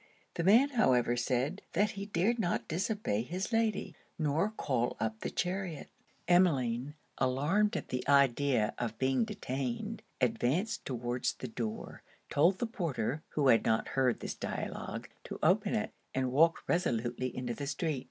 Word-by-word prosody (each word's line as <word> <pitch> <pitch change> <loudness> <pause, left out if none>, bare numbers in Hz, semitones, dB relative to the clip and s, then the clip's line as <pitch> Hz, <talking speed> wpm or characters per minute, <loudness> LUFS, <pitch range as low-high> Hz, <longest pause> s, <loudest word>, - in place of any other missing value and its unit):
The 170 - -2
man 230 +10 +6
however 125 - +3
said, 130 +8 -1
that 210 +1 +2
he 200 -1 -6
dared 210 +5 +1
not 175 -5 0
disobey 180 - -1
his 180 - -4
Lady, 225 -3 0 0.2
nor 155 +5 +1
call 130 - -1
up 110 0 -2
the - - -3
chariot. 180 -3 -3 0.4
Emmeline, 145 -7 +2 0.2
alarmed 165 +12 +2
at - - -6
the 125 - -2
idea 140 -4 +3
of 115 -2 -3
being 130 - +2
detained, 130 - -4 0.2
advanced 185 - 0
towards 120 -1 -2
the 130 - -7
door, 115 -1 -5 0.3
told 170 +6 +4
the 240 - -1
porter 155 - -2
(who 140 -3 +3
had 115 - +5
not 110 0 +1
heard 130 -3 +1
this - - -3
dialogue,) - - -5 0.2
to - - -6
open - - +3
it, - - -1 0.2
and 130 -1 0
walked 165 +5 +3
resolutely 125 -7 0
into 125 -2 -2
the 140 +3 -5
street. 150 0 -1
140 Hz, 150 wpm, -32 LUFS, 125-185 Hz, 0.4 s, man